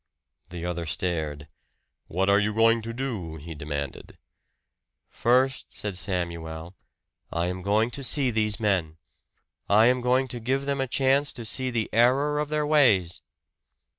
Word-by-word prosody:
The 85 -1 -6
other 85 -2 -3
stared. 75 -4 -3 0.6
"What 95 +3 -1
are 100 +1 +5
you 105 0 -1
going 115 +1 +4
to 115 +1 -6
do?" 115 -10 -4
he 80 +2 -8
demanded. 70 -2 -6 0.9
"First," 130 +3 +1
said 105 -3 -4
Samuel, 85 -1 -4 0.6
"I 85 0 -1
am 90 +1 -3
going 105 +5 +1
to 140 - -5
see 135 -1 +1
these 105 -2 +1
men. 95 -7 0 0.7
I 105 +2 +6
am 125 +1 +3
going 130 +2 +2
to 120 - -5
give 135 +4 -1
them 140 -1 -1
a 135 - -1
chance 135 +3 +2
to 120 - -7
see 130 +4 +1
the 115 -3 -1
error 135 +6 +3
of 150 -1 -2
their 150 0 0
ways." 115 - +3
110 Hz, 155 wpm, -26 LUFS, 85-130 Hz, 0.9 s, I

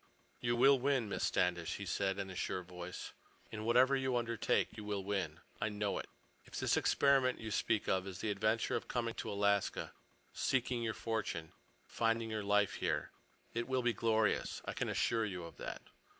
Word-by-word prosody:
"You 120 0 +1
will 135 +2 +6
win, 135 -3 +1
Miss - - -2
Standish," 90 -2 +1
he 100 - -5
said 95 +1 0
in 95 -1 -4
a - - -8
sure 90 +1 -2
voice. 90 0 -7 0.4
"In 110 0 -5
whatever 125 +4 +5
you 130 -2 +1
undertake 115 -2 0
you 105 - -7
will 105 -2 -2
win. 95 -5 -2 0.2
I 110 - +1
know 105 -1 -1
it. - - -7 0.3
If - - -12
this - - +2
experiment 135 -2 +3
you 110 -1 -5
speak 110 0 +1
of 95 0 +1
is 95 -2 -6
the 105 +3 -1
adventure 110 +3 +1
of - - -3
coming 115 -2 -1
to - - -5
Alaska—seeking 100 +4 -1
your 110 -2 -1
fortune—finding 115 +3 -2
your 110 -1 -1
life 105 0 +3
here—it 115 0 -4
will 130 -1 +1
be 120 -1 +3
glorious. 110 0 +1
I - - -3
can - - -2
assure 115 -1 +1
you 90 -4 -4
of 85 - -10
that." - - -6
110 Hz, 180 wpm, -35 LUFS, 100-120 Hz, 0.4 s, will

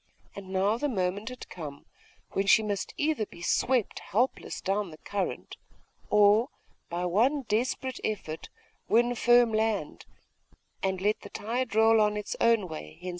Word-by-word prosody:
And 195 -1 -9
now 195 +4 +1
the 290 - 0
moment 200 0 -1
had 250 - -9
come 145 -5 -8 0.5
when 195 +1 -1
she 220 - +6
must 205 -2 -3
either 290 -8 0
be 170 - -12
swept 250 +4 +1
helpless 245 +7 -1
down 195 0 -1
the 155 - -11
current, 200 +3 -4 0.5
or, 210 +4 +5 0.4
by 175 +1 -2
one 245 - +2
desperate 255 +3 -1
effort, 175 -7 -4 0.4
win 240 +2 +4
firm 240 -1 +4
land, 215 -7 -1 0.7
and 190 -1 -1
let 210 +2 +1
the - - -10
tide 230 +1 -3
roll 225 0 +5
on 210 0 +2
its 210 - -4
own 230 -5 +3
way 80 - -8
henceforth.... 180 - -8
210 Hz, 155 wpm, -28 LUFS, 190-235 Hz, 0.7 s, she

